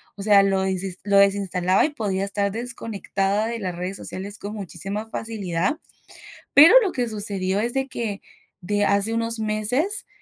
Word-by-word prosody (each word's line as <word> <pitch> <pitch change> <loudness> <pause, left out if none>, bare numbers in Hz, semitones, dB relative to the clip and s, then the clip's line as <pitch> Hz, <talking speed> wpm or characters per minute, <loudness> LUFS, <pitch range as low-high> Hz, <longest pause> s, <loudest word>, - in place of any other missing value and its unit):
o 200 - -9
sea, 205 -1 +6
lo 195 -1 +1
desinst 190 -1 -3
lo 200 -1 +2
desinstalaba, 195 -2 +2
y 310 - -1
podía 200 -8 -2
estar 200 0 -1
desconectada 215 -3 -2
de 230 0 -4
las 185 -4 -4
redes 180 +2 -5
sociales 200 +2 -5
con 205 +1 -7
muchísima 195 +2 -5
facilidad. 220 - -3 0.8
Pero 310 +8 +9
lo 400 -5 0
que 245 -5 -2
sucedió 200 -3 -1
es 235 +3 -1
de 270 0 0
que, 225 -6 -5 0.4
de 205 +3 0
hace 200 +3 +2
unos 230 0 0
meses, 220 - 0
205 Hz, 165 wpm, -23 LUFS, 195-230 Hz, 0.8 s, Pero